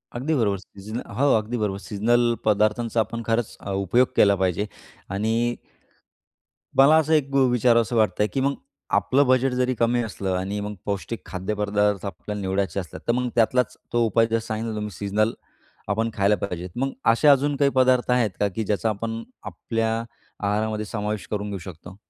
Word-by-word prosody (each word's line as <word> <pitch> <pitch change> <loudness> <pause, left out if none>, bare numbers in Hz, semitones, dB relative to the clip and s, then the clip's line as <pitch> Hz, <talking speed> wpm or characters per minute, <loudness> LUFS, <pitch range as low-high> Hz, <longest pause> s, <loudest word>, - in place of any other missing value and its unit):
अगदी 135 +7 -1
बरोबर 105 -7 +1
सीझनल 100 +4 -8 0.2
हो, 140 +1 +3
अगदी 110 +3 -3
बरोबर. 105 -3 -1
सीजनल 120 +4 +1
पदार्थांचा 110 +2 +2
आपण 110 +2 -1
खरंच 115 -1 -1 0.2
उपयोग 100 +6 +2
केला 100 -1 +5
पाहिजे. 95 +1 0 0.4
आणि, 115 +4 0 1.2
मला 140 +3 +7
असं 160 0 +2
एक 140 -3 +1
विचारावसं 125 -3 +3
वाटतंय 105 -2 +2
की 135 - 0
मग, 140 +1 +1 0.4
आपलं 140 +2 +3
बजेट 130 +1 +3
जरी 125 0 +1
कमी 120 +1 +2
असलं 100 -3 -3
आणि 100 +3 -3
मग 105 +1 -4
पौष्टिक 100 +3 -3
खाद्यपदार्थ 105 +1 -1
आपल्याला 105 +1 -5
निवडायचे 95 +1 -1
असले, 90 -4 -7
तर - - +4
मग 125 0 0
त्यातलाच 120 +2 +2 0.2
तो 120 - +3
उपाय, 115 +1 +3
जसं 115 0 -1
सांगितलं 110 0 -3
तुम्ही 105 0 -4
सीजनल, 105 +2 +1 0.6
आपण 110 +3 0
खायला 100 +1 +3
पाहिजे. 90 -2 -4
मग 135 +2 -1 0.2
असे 120 +6 +3
अजून 145 0 +4
काही 140 -1 +3
पदार्थ 130 -1 +3
आहेत 125 -4 +3
का? 105 - +3
की 110 +3 -4
ज्याचा 105 +2 0
आपण 115 +2 -4 0.2
आपल्या 115 -1 -2 0.5
आहारामध्ये 105 +1 0
समावेश 105 -2 -3
करून 105 -1 -2
घेऊ 100 - -4
शकतो? 90 +1 -11
110 Hz, 165 wpm, -24 LUFS, 100-120 Hz, 1.2 s, मला